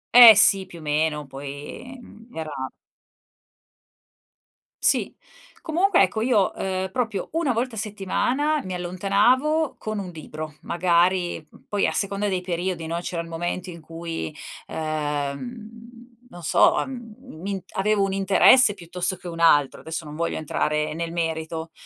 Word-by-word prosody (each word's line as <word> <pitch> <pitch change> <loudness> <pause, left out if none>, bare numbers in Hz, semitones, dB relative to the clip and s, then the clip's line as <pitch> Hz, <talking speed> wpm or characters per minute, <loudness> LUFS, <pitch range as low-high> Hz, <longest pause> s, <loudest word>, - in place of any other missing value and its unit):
Eh, 235 -3 +12
sì. 195 -1 +6
Più 175 - -12
o - - -11
meno, 150 0 0
poi, 145 - -9
mhmm, 225 -1 -15
era 160 -1 -4 2.3
Sì. - - +2 0.5
Comunque, 350 +3 +2
ecco, 220 - +1
io, 225 -5 +2
ehm, 190 0 -3
proprio 220 -2 -2
1 325 -6 +1
volta 235 +1 -2
a - - -7
settimana 240 +9 -1
mi 185 - -5
allontanavo 235 - +1
con 215 -1 -5
un 195 -3 -5
libro. 155 -1 -8
Magari 175 +1 +1
m - - -17
poi 205 -1 +1
a - - -1
seconda 200 +1 0
dei 185 -2 -1
periodi, 180 -1 -3
no, 165 +1 -3
c'era 175 -1 -4
il 165 - -10
momento 175 +2 -4
in 170 -1 -9
cui, 165 -1 -6 0.3
ehm, 155 - -4 0.6
non 175 - -11
so, 160 - +4
ehm, 240 -5 -8
m'in 200 -6 -6
avevo 205 +1 +2
un 195 - 0
interesse 200 +4 +5
piuttosto 180 0 0
che 180 0 -9
un 165 -1 -7
altro. 145 -5 +4
Adesso 160 +1 -5
non 150 -1 -9
voglio 170 0 -1
entrare 150 0 -1
nel 165 0 -4
merito, 160 -1 -3
185 Hz, 150 wpm, -24 LUFS, 165-215 Hz, 2.3 s, Eh